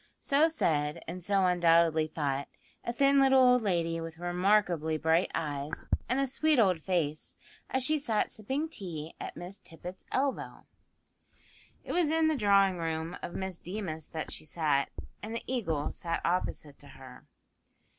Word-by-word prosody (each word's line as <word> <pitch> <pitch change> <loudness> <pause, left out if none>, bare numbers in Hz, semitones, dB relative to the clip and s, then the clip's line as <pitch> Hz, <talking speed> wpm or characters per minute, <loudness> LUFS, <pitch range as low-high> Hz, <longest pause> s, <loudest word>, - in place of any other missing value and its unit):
So 290 +3 +3
said, 150 - 0
and 180 +3 -5
so 195 +1 +2
undoubtedly 165 -3 +4
thought, 140 -3 -2 0.4
a - - -2
thin 275 +2 +4
little 270 -1 +6
old 250 -1 +6
lady 170 -5 0
with 165 0 -7
remarkably 175 -2 +1
bright 160 +3 +2
eyes, 145 -1 -3 0.2
and 255 +2 +1
a 275 - +2
sweet 305 +3 +2
old 190 -7 +4
face, 155 -4 -2 0.3
as 265 - 0
she 310 +4 +2
sat 225 -6 0
sipping 265 +9 -2
tea 170 - -6
at - - -7
Miss 180 +3 -6
Tippet's 180 +2 -10
elbow. 275 0 -2 1.2
It - - -6
was 345 -4 +2
in 320 0 +3
the 315 - +1
drawing 200 -5 +3
room 165 +1 -3
of 175 - -6
Miss 190 -2 -3
Deemas 175 -5 -5
that 160 -1 -5
she - - -6
sat, 150 -3 0 0.3
and 220 +2 -5
the 230 - -4
Eagle 165 - -1
sat 165 -1 -3
opposite 165 -4 -2
to 145 - -11
her. 130 -1 -13
180 Hz, 160 wpm, -30 LUFS, 160-235 Hz, 1.2 s, little